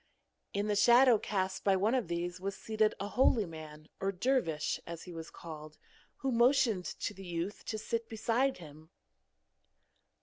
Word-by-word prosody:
In 200 Hz, +1 st, -1 dB
the 210 Hz, -1 st, 0 dB
shadow 240 Hz, +2 st, +6 dB
cast 190 Hz, -2 st, -2 dB
by 195 Hz, -1 st, +4 dB
one 205 Hz, +5 st, +2 dB
of 255 Hz, -7 st, +1 dB
these 175 Hz, +1 st, -3 dB
was 195 Hz, 0 st, -3 dB
seated 215 Hz, -1 st, +1 dB
a 200 Hz, -, -3 dB
holy 235 Hz, -2 st, +3 dB
man 155 Hz, -2 st, -10 dB
or 195 Hz, 0 st, 0 dB
dervish, 185 Hz, -, 0 dB
as 170 Hz, -1 st, -6 dB
he 180 Hz, -, -9 dB
was 165 Hz, -1 st, -7 dB
called, 155 Hz, -2 st, -10 dB, 0.4 s
who 270 Hz, -, -2 dB
motioned 235 Hz, -5 st, +3 dB
to -, -, -4 dB
the 195 Hz, -, -11 dB
youth 175 Hz, +2 st, -4 dB
to 215 Hz, -, -3 dB
sit 230 Hz, +1 st, -3 dB
beside 235 Hz, +4 st, +1 dB
him. 155 Hz, -1 st, -13 dB
195 Hz, 165 wpm, -32 LUFS, 170-230 Hz, 0.4 s, shadow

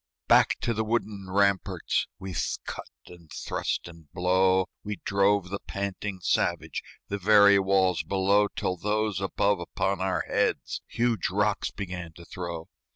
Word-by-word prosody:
Back -, -, +5 dB
to 115 Hz, -, 0 dB
the 110 Hz, 0 st, -1 dB
wooden 105 Hz, -3 st, -2 dB
ramparts, 100 Hz, -2 st, +1 dB
With 95 Hz, -2 st, -3 dB
cut -, -, -6 dB, 0.2 s
and 85 Hz, -3 st, -15 dB
thrust -, -, -3 dB
and 80 Hz, -3 st, -14 dB
blow, 95 Hz, +1 st, +3 dB, 0.2 s
We 105 Hz, 0 st, -3 dB
drove 100 Hz, -1 st, +2 dB
the 100 Hz, -, -3 dB
panting 100 Hz, -1 st, -4 dB
savage, -, -, 0 dB, 0.3 s
The 100 Hz, -, -2 dB
very 100 Hz, 0 st, +6 dB
walls 95 Hz, -2 st, +2 dB
below, 100 Hz, +2 st, +2 dB
Till 90 Hz, -2 st, -3 dB
those 105 Hz, 0 st, -1 dB
above 100 Hz, 0 st, +1 dB
upon 95 Hz, +2 st, -2 dB
our 95 Hz, 0 st, 0 dB
heads -, -, -1 dB
Huge 115 Hz, -4 st, 0 dB
rocks -, -, 0 dB
began 90 Hz, -4 st, -6 dB
to 85 Hz, +1 st, -13 dB
throw. 85 Hz, -2 st, -6 dB
95 Hz, 145 wpm, -27 LUFS, 90-100 Hz, 0.3 s, very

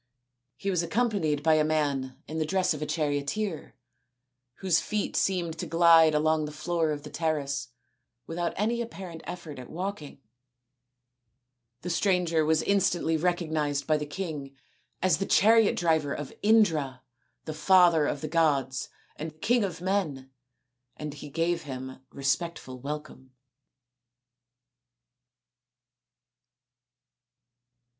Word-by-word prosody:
He 195 Hz, -, -2 dB
was 180 Hz, -3 st, +1 dB
accom 230 Hz, +8 st, +1 dB
panied 155 Hz, -8 st, -1 dB
by 160 Hz, 0 st, +5 dB
a 155 Hz, 0 st, +4 dB
man 145 Hz, -4 st, -1 dB
in 160 Hz, +1 st, -4 dB
the 155 Hz, -, +1 dB
dress 185 Hz, 0 st, +1 dB
of 150 Hz, -, -7 dB
a 150 Hz, -, -2 dB
charioteer, 155 Hz, +5 st, -2 dB, 0.8 s
whose 180 Hz, -4 st, +2 dB
feet 210 Hz, -1 st, -2 dB
seemed 170 Hz, -4 st, 0 dB
to -, -, -3 dB
glide 165 Hz, -2 st, +6 dB
along 155 Hz, 0 st, +2 dB
the 150 Hz, -, -6 dB
floor 165 Hz, +1 st, -1 dB
of 145 Hz, -1 st, -3 dB
the 150 Hz, -, -9 dB
terrace 140 Hz, -5 st, -1 dB, 0.6 s
without 170 Hz, +3 st, -2 dB
any 230 Hz, +4 st, 0 dB
apparent 185 Hz, -8 st, -7 dB
effort 155 Hz, -6 st, -7 dB
at 125 Hz, -, -10 dB
walking. 180 Hz, -4 st, -5 dB, 1.6 s
The 180 Hz, -, -4 dB
stranger 175 Hz, -3 st, +2 dB
was 160 Hz, +1 st, +2 dB
instantly 175 Hz, -4 st, +2 dB
recognised 155 Hz, -4 st, 0 dB
by 155 Hz, -1 st, +2 dB
the 150 Hz, 0 st, -4 dB
king 145 Hz, -5 st, -5 dB, 0.5 s
as 180 Hz, -5 st, +3 dB
the 195 Hz, -, -2 dB
chariot 225 Hz, +1 st, +5 dB
driver 160 Hz, -4 st, +1 dB
of 145 Hz, -2 st, -6 dB
Indra, 160 Hz, -, +3 dB, 0.4 s
the 155 Hz, -, -4 dB
father 170 Hz, -2 st, +5 dB
of 145 Hz, -, -2 dB
the 155 Hz, -, -3 dB
gods 140 Hz, -6 st, +1 dB, 0.3 s
and 155 Hz, 0 st, -7 dB
king 240 Hz, +3 st, +2 dB
of 175 Hz, -4 st, -4 dB
men, 160 Hz, -9 st, -1 dB, 0.7 s
and 150 Hz, -1 st, -5 dB
he 145 Hz, 0 st, -9 dB
gave 165 Hz, +3 st, 0 dB
him 130 Hz, -1 st, -7 dB
respectful 140 Hz, -1 st, -2 dB
welcome. 140 Hz, -1 st, -7 dB
160 Hz, 125 wpm, -28 LUFS, 145-180 Hz, 1.6 s, glide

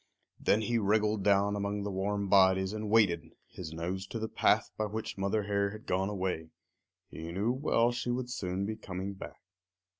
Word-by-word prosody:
Then 105 Hz, -, +3 dB
he 115 Hz, +2 st, +1 dB
wriggled 105 Hz, 0 st, +2 dB
down 100 Hz, +1 st, +3 dB
among 100 Hz, 0 st, -2 dB
the 100 Hz, -, -3 dB
warm 100 Hz, +1 st, -1 dB
bodies 95 Hz, 0 st, +4 dB
and 110 Hz, -1 st, -4 dB
waited, 85 Hz, -8 st, +3 dB
his 85 Hz, -4 st, -8 dB
nose 90 Hz, +4 st, -4 dB
to 115 Hz, -, -5 dB
the 110 Hz, 0 st, -2 dB
path -, -, +2 dB
by 110 Hz, -, -1 dB
which 110 Hz, +2 st, -4 dB
Mother 100 Hz, +2 st, 0 dB
Hare 100 Hz, 0 st, +1 dB
had 110 Hz, +2 st, -10 dB
gone 95 Hz, +2 st, 0 dB
away. 90 Hz, -5 st, -2 dB, 0.6 s
He 80 Hz, +1 st, -6 dB
knew 100 Hz, +7 st, 0 dB
well 125 Hz, -3 st, +2 dB
she 120 Hz, 0 st, -3 dB
would 125 Hz, 0 st, -2 dB
soon 95 Hz, -5 st, -2 dB
be 110 Hz, +2 st, -3 dB
coming 95 Hz, -2 st, -5 dB
back. 95 Hz, -, -10 dB
100 Hz, 185 wpm, -31 LUFS, 95-110 Hz, 0.6 s, bodies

